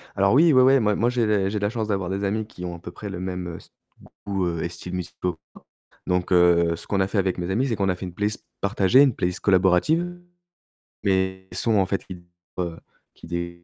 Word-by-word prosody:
Alors 100 0 +3
oui, 160 +4 +6
ouais, 130 - +6
ouais, 135 +1 +6
moi 105 -3 +2
moi 120 +4 +2
j'ai 125 -2 +1
les 100 -3 +1
j'ai 105 +1 -2
la 100 0 0
chance 110 -1 -3
d'avoir 95 -4 -1
des 95 +1 -2
amis 105 +2 -1
qui 90 -4 -9
ont 90 -1 -5
à - - -11
peu 85 - -9
près 105 +3 -8
le 90 -2 -6
même 90 -2 -5
st - - -13 0.5
goût 90 -4 -1
et 85 - -2
styles 90 +1 -8
musicaux 90 0 -3
que 80 - -22 0.2
moi. - - -12 0.5
Donc 90 0 0
heu, 85 -1 +4
ce - - -10
qu'on 100 - 0
a 95 - +3
fait 100 - -1
avec 95 -2 0
mes 90 +1 -3
amis, 120 +8 +1
c'est 115 - -1
qu'on 100 -1 0
a 90 - +2
fait 95 - -6
une 90 - -8
playlist 105 +3 -2 0.2
partagée, 100 +5 +4
une 135 -5 +3
playlist 90 0 -2
collaborative. 100 - +2 0.9
Mes 95 -1 0
sons, 115 -2 +1
en 95 - +3
fait, 95 +1 -3
qui 90 -2 -10 0.9
qui 85 0 -6
95 Hz, 235 wpm, -24 LUFS, 90-105 Hz, 0.9 s, oui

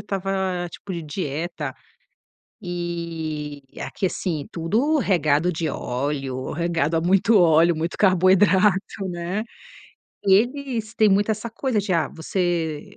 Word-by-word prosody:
estava 190 -3 -2
tipo 195 - -8
de 170 -2 -4
dieta 150 -2 -4 0.9
e 165 -4 -4 0.2
aqui, 195 - -2
assim, 165 -5 -3
tudo 230 - +1
regado 170 - +2
de 160 -1 -2
óleo, 130 0 -3
regado 165 -1 0
a - - +2
muito 195 +5 +4
óleo, 170 -1 +5
muito 165 +2 -3
carboidrato, 190 +1 +3
né. 180 +4 -3 0.8
Eles 230 +2 +1
têm 215 -1 +5
muito 200 +2 +3
essa 215 +2 -2
coisa 245 0 -1
de 200 -1 -1
"ah, 165 -2 +1
você 165 -2 -2
175 Hz, 120 wpm, -23 LUFS, 160-195 Hz, 0.9 s, óleo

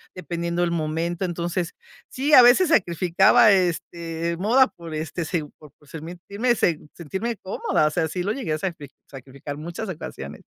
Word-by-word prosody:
dependiendo 170 -1 -2
el 170 - 0
momento. 170 +3 -2
Entonces, 175 0 -2 0.4
sí, 285 +4 -1
a 255 - +11
veces 270 +9 +6
sacrificaba, 185 - +4
este, 170 -2 -1
moda 250 +7 +4
por, 170 -4 -11
este 160 +2 -4
se 165 -2 -2
por 150 -3 -16
por 145 - -23
sent 165 +2 -8 0.7
sentirme 190 +8 -4
cómoda, 185 -5 0
o - - +2
sea, 160 +1 0
sí 175 +3 -3
lo 205 - -1
llegué 220 - -3
a - - 0
sacri 165 -6 -4 0.2
sacrificar 140 +2 -8
muchas 170 +7 -6
ocasiones. 75 - -7
170 Hz, 160 wpm, -23 LUFS, 160-190 Hz, 0.7 s, a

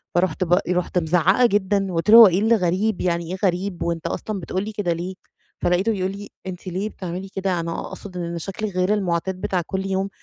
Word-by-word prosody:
فرُحت 185 0 +1
ب 175 +2 +3
رُحت 180 0 0
مزعقة 175 +8 +3
جدًا، 195 -3 +1
قُلت 165 +5 -1
له: 225 - +10
"هو 230 - +11
إيه 185 0 +2
اللي 225 +3 +4
غريب؟ 190 +2 0
يعني 170 -1 -1
إيه 190 - -3
غريب! 180 0 -1
وأنت 170 0 -2
أصلًا 210 +4 -4
بتقول 185 +2 -3
لي 215 - -5
كده 190 -5 0
ليه؟" 175 +3 -5 0.5
فلقيته 180 +5 +2
بيقول 190 -3 -1
لي: 200 +1 -8 0.2
"أنتِ 185 0 -7
ليه 190 +4 -2
بتعملي 185 -1 -6
كده؟ 190 -2 0
أنا 165 0 -3
أقصد 185 -3 -8
إن 170 -1 -3
شكلِك 195 +3 -4
غير 185 +3 +2
المعتاد 185 -1 -1
بتاع 185 -2 0
كُلّ 190 0 -3
يوم، 195 +1 -1
185 Hz, 210 wpm, -22 LUFS, 175-200 Hz, 0.5 s, هو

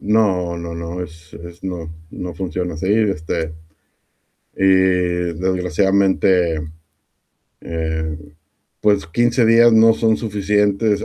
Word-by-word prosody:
No 95 -5 +1
no 85 0 -6
no, 85 +2 -5
es 80 -1 -14
es, 85 +1 -12
no 85 -4 -5 0.2
no 90 -1 -6
funciona 90 -2 -4
así, 80 - -5
este, 85 -7 -1 1.0
y 95 - 0 0.7
desgraciadamente, 95 -1 +1 1.0
eh, 80 -1 -3 0.6
pues, 100 -5 +2
15 120 +7 +1
días 115 +1 +6
no 115 0 +6
son 110 -1 +1
suficientes, 105 0 0
95 Hz, 105 wpm, -19 LUFS, 85-105 Hz, 1.0 s, días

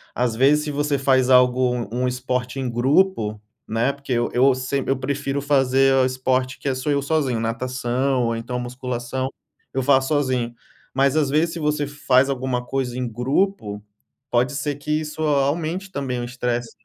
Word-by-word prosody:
às 120 -2 0
vezes 140 +5 +4
se 150 - -3
você 145 0 0
faz 130 -1 +2
algo 125 -2 +3
um 125 +1 0
esporte 125 +1 -2
em 130 - -2
grupo, 120 - +2 0.3
né, 115 +4 +1
porque 140 -1 -10
eu 120 -1 +1
eu 130 +1 +4
sem 130 +1 -2
eu 135 - +1
prefiro 140 +1 -2
fazer 135 -1 +3
o 130 -1 +4
esporte 130 0 0
que - - -7
é 135 - +2
sou 130 +3 -2
eu 140 0 +1
sozinho, 140 -5 0
natação 125 +2 -1
ou 115 0 0
então 120 +2 -4
musculação, 125 +1 -4 0.4
eu 135 - -1
faço 135 0 +3
sozinho, 130 -5 0 0.4
mas 135 +1 +3
às 150 -3 +2
vezes 160 +4 +1
se 170 - -5
você 150 -1 0
faz 135 -2 +2
alguma 130 -2 -2
coisa 125 -1 -2
em 125 -1 -2
grupo, 120 - -1 0.5
pode 125 +3 +2
ser 145 0 -2
que 145 - -10
isso 155 0 -6
aumente 155 +6 0
também 135 -6 -3
o - - -3
estresse. 120 -1 -3
130 Hz, 180 wpm, -22 LUFS, 125-140 Hz, 0.5 s, vezes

